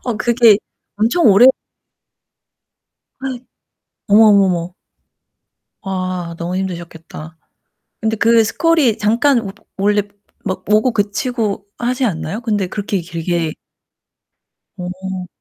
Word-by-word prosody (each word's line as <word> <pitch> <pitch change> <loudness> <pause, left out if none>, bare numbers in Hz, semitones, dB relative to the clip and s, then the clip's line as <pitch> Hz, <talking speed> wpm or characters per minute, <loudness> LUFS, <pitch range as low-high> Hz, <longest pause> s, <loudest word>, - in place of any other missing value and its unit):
어 245 -3 -2
그게 230 -1 +4 0.4
엄청 230 +12 +2
오래 215 +4 +7 1.7
아이. 260 -1 -4 0.7
어머, 210 +2 +6
어머, 200 -1 +5
어머. 175 -1 -2 1.1
와 185 -3 -4
너무 175 +2 -3
힘드셨겠다. 170 -3 -7 0.7
근데 220 0 0
그 230 +1 +4
스콜이 305 -3 +2
잠깐 235 +5 +2
워 195 -3 -7 0.2
원래 205 +1 +2
마 205 0 -19 0.3
막 185 -2 -3
오고 215 +4 +3
그치고 205 0 -2
하지 250 +2 -1
않나요? 190 -1 -3
근데 210 -5 -1
그렇게 200 0 -3
길게 170 -1 -2 1.3
어. 185 +1 -6
205 Hz, 210 characters per minute, -17 LUFS, 185-230 Hz, 1.7 s, 오래